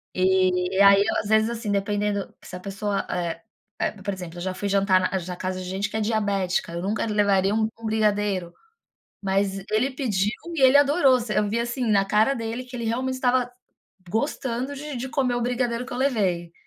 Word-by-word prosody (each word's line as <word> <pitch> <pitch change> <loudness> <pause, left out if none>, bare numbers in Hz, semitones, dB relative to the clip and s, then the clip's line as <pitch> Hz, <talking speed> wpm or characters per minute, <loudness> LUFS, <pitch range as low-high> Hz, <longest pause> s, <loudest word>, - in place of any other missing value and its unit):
E 185 0 +2
aí, 200 0 +7
eu - - 0
às 205 - -4
vezes, 220 +1 +4
assim, 230 -3 -3
dependendo, 205 0 -1
se 180 - -9
a - - -6
pessoa, 200 +1 -2
eh 170 -2 -3 0.4
eh, - - +1
por 200 -1 -2
exemplo, 175 -2 -8
eu - - -6
já 185 0 -2
fui 200 +2 -3
jantar 195 -1 +3
a 190 - +1
na 180 -1 -5
casa 185 0 -3
de - - -6
gente 195 +2 -2
que 220 - -3
é - - -1
diabética, 200 -5 0
eu 170 - -3
nunca 210 +4 -1
levaria 200 -2 +2
um 220 0 +2
um 225 - -9
brigadeiro, 205 -5 0 0.7
mas 195 0 0
ele 245 +6 +2
pediu 210 -6 0 0.2
e 280 - -1
ele 265 +2 +7
adorou, 285 -3 +4
você 225 -2 -3
eu 210 - 0
vi, 230 +2 0
assim, 240 +1 -2
na 200 -2 +3
cara 215 +7 +3
dele 230 +2 -4
que 250 0 -10
ele 235 -1 -4
realmente 260 +3 -1
estava 250 -1 +1 0.6
gostando 250 - -2
de 295 0 -6
de 260 +2 -4
comer 260 -4 0
o 240 - -1
brigadeiro 245 0 -1
que 260 - -8
eu - - -4
levei. 190 -11 0
210 Hz, 210 wpm, -24 LUFS, 190-245 Hz, 0.7 s, aí